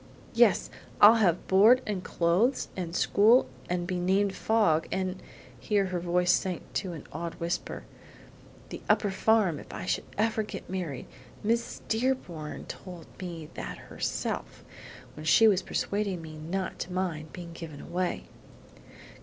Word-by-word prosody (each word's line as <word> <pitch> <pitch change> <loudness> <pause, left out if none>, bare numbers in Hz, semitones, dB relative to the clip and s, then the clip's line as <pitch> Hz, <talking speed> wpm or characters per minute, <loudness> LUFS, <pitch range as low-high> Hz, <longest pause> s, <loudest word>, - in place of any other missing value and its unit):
"Yes; - - +4 0.3
I'll 215 +3 +9
have 175 -4 +2
board, 215 +7 +6
and 200 -3 -3
clothes, 180 +12 +1
and 175 -2 -4
school, 220 +8 +5 0.2
and 175 0 -1
be 180 0 -2
named 190 +2 +2
Fogg, 195 -10 +2
and" 185 0 -2 0.4
(here 205 -2 +1
her 175 - 0
voice 180 +1 +2
sank 180 -1 0
to 185 -3 -2
an 155 - -9
awed 165 +2 -4
whisper) 170 +1 -3 0.9
"the - - -7
upper 205 - +3
farm 195 -5 +2
if - - -12
I - - -6
should - - -1
ever 220 +1 +1
get 215 - -7
married; 175 -8 -4 0.4
Miss 230 +2 -1
Dearborn 220 -10 -2
told 175 -4 -9 0.2
me 165 -4 -6
that - - -6
herself, - - -4 0.5
when 155 - -8
she 225 +7 +7
was 195 -3 +4
persuading 200 -1 -2
me 155 -1 -9
not 175 +5 -4
to 180 - -5
mind 170 -4 -3
being 170 -2 -8
given 165 -4 -8
away." 180 0 -2
185 Hz, 145 wpm, -28 LUFS, 170-205 Hz, 0.9 s, I'll